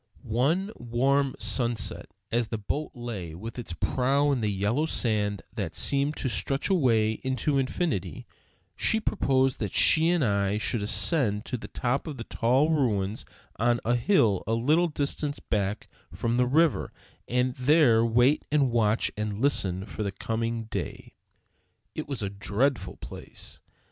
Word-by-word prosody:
One 145 - 0
warm 135 +3 +1
sunset, 115 0 -1 0.2
as 120 0 +1
the 110 - -3
boat 145 +9 -3
lay 105 -10 -6
with 115 +7 -7
its 110 -7 -5
prow 135 - +1
in 130 -4 0
the 105 - 0
yellow 105 +11 0
sand 105 - 0
that - - -4
seemed 140 +2 0
to - - -2
stretch 135 - -1
away 115 - +2
into 135 +2 0
infinity, 135 - -2 0.5
she 220 - +2
proposed 135 - +1
that 105 -5 -3
she 160 +1 +5
and 175 -5 +2
I 100 -1 +1
should 110 +1 -1
ascend 105 0 +1
to 125 - -3
the 115 - -9
top 125 +5 -2
of 150 -4 -6
the 115 - -5
tall 130 +8 +1
ruins 110 -9 0 0.3
on 120 +1 +2
a 120 - +2
hill 115 - +2
a 110 - 0
little 155 +9 +3
distance 145 -1 -2
back 100 -1 -2 0.2
from 115 +8 -1
the 125 0 +3
river, 155 +3 +2 0.4
and 125 +1 +1
there 130 -3 +4
wait 120 +5 +3
and 140 -4 +2
watch 110 -1 +2
and 105 -1 -3
listen 95 -9 +1
for 105 - -7
the 100 -2 -1
coming 115 +3 -3
day. 110 - -6 0.8
It 155 - -5
was 135 -6 -4
a 100 - -1
dreadful 105 +7 -1
place. - - -10
120 Hz, 155 wpm, -27 LUFS, 110-140 Hz, 0.8 s, she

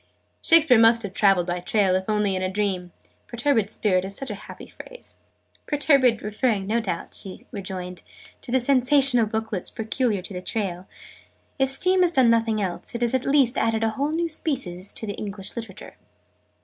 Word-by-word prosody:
"Shakespeare 325 -8 +5
must 230 0 +5
have 200 -2 -6
traveled 195 -3 +3
by 175 0 -4
rail, 195 -3 +3
if 190 +2 -2
only 210 -2 +1
in 185 - -2
a 185 - -1
dream: 190 -3 -2 0.4
'perturbed 240 -4 0
Spirit' 190 -4 0
is 195 +1 -6
such 270 - -5
a - - -9
happy - - -10
phrase." - - -12 0.5
"'Perturbed' 275 -6 +3
referring, 210 -1 -1
no 220 +4 0
doubt," 170 -7 -4
she 190 - -8
rejoined, 185 -3 -6 0.4
"to - - -7
the 260 - +3
sensational 255 -2 +4
booklets 220 -3 -3
peculiar 220 -3 -2
to 195 - -7
the 180 0 -6
Rail. 185 -4 -3 0.7
If 270 0 +2
Steam 365 +7 +2
has 350 -1 +2
done 255 -5 +5
nothing 225 -1 +1
else, 190 +3 -5
it 235 - -4
has 235 - 0
at 260 0 0
least 275 -3 +3
added 225 0 0
a 225 - +1
whole 280 +6 -2
new 335 +2 -1
Species 245 - -3
to - - -5
English 205 -1 -6
Literature!" 225 -5 -8
220 Hz, 180 wpm, -24 LUFS, 195-260 Hz, 0.7 s, Shakespeare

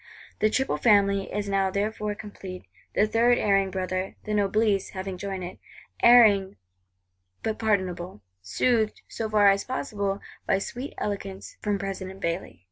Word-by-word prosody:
The 215 - +3
"Triple 265 +5 0
Family" 200 -3 +3
is 205 0 -2
now 195 -1 +1
therefore 210 +1 -2
complete; 195 -3 -9 0.3
the 210 - +4
third 235 +3 +3
erring 195 -2 +2
brother, 185 0 -3
the 210 - -3
Noblesse, 205 -1 +2
having 190 0 -4
joined 190 0 -5
it;—erring 200 +2 +3 0.9
but 220 -1 -2
pardonable; 185 - -1 0.2
soothed, 220 - 0
so 220 -1 -4
far 210 -1 +5
as 195 0 0
possible, 205 -6 -2 0.3
by 195 - +3
sweet 245 +7 -6
eloquence 195 -2 -5
from 205 -1 0
President 195 -1 -5
Bailly. 170 - -3
200 Hz, 135 wpm, -26 LUFS, 190-215 Hz, 0.9 s, far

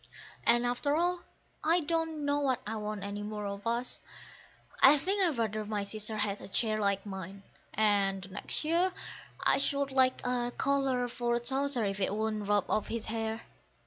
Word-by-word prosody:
And 240 +1 +5
after 245 +4 0
all 350 +2 +1 0.4
I 330 +3 +4
don't 325 -1 -1
know 285 0 +1
that 255 -3 +1
I 220 +2 -3
want 210 -1 -4
any 200 +1 -4
more 210 0 -4
of 200 +1 -5
us: 235 +2 -1 0.8
I 285 +3 +9
think 385 +8 0
I'd 335 -8 +2
rather 215 -2 -1
my 210 -1 -2
sister 215 +1 -2
had 205 -1 -1
a - - -8
chair 215 +2 0
Like 200 -1 0
mine; 195 0 -7 0.3
and 200 -2 +2
the 195 - -9
next 190 - -2
year 345 +4 +2 0.5
I - - +4
should 280 0 0
like 260 -1 +3
a 245 -1 0
collar 270 -3 +1
for 240 0 0
Towser 265 0 0
if 195 0 -2
it 195 +1 0
wouldn't 215 -1 -2
rub 205 -1 +2
off 215 - 0
his 230 -1 -3
hair. 225 0 -3
230 Hz, 180 wpm, -31 LUFS, 205-275 Hz, 0.8 s, I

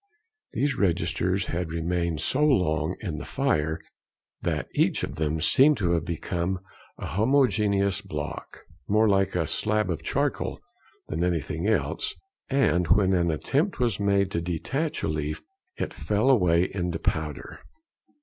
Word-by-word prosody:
These 140 -2 0
registers 90 0 +1
had 85 -1 -3
remained 85 -1 -1
so 145 +3 +1
long 90 - +2
in 85 -7 -4
the - - -6
fire 80 +1 0 0.6
that - - -1
each - - +1
of - - -4
them 80 0 0
seemed 140 - +5
to 90 -5 0
have 85 -2 +1
become 85 +2 -2 0.4
a - - -6
homogeneous 105 - +2
block, 75 -1 -6 0.2
more 110 +2 +4
like 95 -2 +2
a 85 -2 +1
slab 105 +4 0
of 80 - -3
charcoal - - -1 0.5
than 80 +3 -1
anything 85 +1 -1
else; 110 - 0 0.3
and 90 - +2
when 95 +3 +4
an 85 -2 +2
attempt 140 - 0
was 120 -6 0
made 100 -1 +2
to 85 - -1
detach 135 - -2
a - - +1
leaf 75 -1 -3 0.3
it - - -3
fell 105 +6 +1
away 90 -8 +4
into 90 -3 -2
powder. 80 -2 -3
90 Hz, 145 wpm, -26 LUFS, 80-105 Hz, 0.6 s, seemed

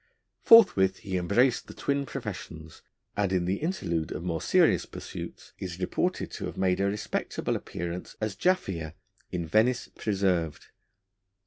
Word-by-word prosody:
Forthwith 95 - +7
he 95 -2 -4
embraced 110 +8 +2
the - - -10
twin 140 0 -1
professions, 90 - -7 0.3
and 100 -2 +1
in 90 -2 +1
the 95 +3 0
interlude 85 - -2
of 85 - -4
more 85 -3 -2
serious - - +3
pursuits - - -8
is 90 -2 -5
reported 90 - -1
to - - -5
have - - -8
made 95 -1 +2
a 100 - +2
respectable 105 +1 -2
appearance 85 +1 -5
as 110 -3 -2
Jaffier 90 - 0 0.4
in 85 -2 -2
Venice 115 +8 +2
Preserved. 95 -7 -1
95 Hz, 140 wpm, -28 LUFS, 85-110 Hz, 0.4 s, Forthwith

